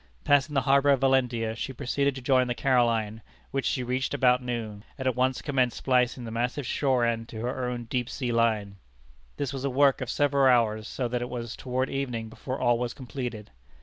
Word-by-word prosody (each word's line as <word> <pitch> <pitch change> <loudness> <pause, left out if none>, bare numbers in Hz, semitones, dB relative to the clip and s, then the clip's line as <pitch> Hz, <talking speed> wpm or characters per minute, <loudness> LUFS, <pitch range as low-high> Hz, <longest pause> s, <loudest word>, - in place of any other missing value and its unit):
Passing 145 +1 +3
the 135 - +3
harbor 140 +2 +3
of 140 -2 +4
Valentia, 125 -4 +1
she 130 +3 -4
proceeded 140 +1 -1
to 130 - -8
join 130 -1 +3
the 120 - -2
Caroline, 115 -5 +1 0.3
which 135 -1 -1
she 130 - 0
reached 130 +3 -1
about 125 -2 +3
noon, 115 -4 -5
and 130 - -3
at 130 - +1
once 130 0 0
commenced 130 -4 +1
splicing 125 -1 +1
the 115 - -6
massive 125 +4 -2
shore 130 -2 +1
end 115 -1 -2
to 110 - -7
her 125 +1 -2
own 120 -1 -4
deep 120 +1 -2
sea 125 -4 -3
line. 110 -4 +1 0.6
This 140 -2 -2
was 135 -1 -5
a 140 - 0
work 135 +1 +3
of - - -4
several 140 -2 +3
hours, 110 -3 +2
so 125 - -3
that 120 +1 -2
it 125 - -4
was 120 -2 -5
toward 130 +1 -2
evening 125 -5 -3
before 130 +4 -6
all 120 -1 +2
was 120 0 -3
completed. 125 -5 -6
125 Hz, 210 wpm, -27 LUFS, 115-135 Hz, 0.6 s, of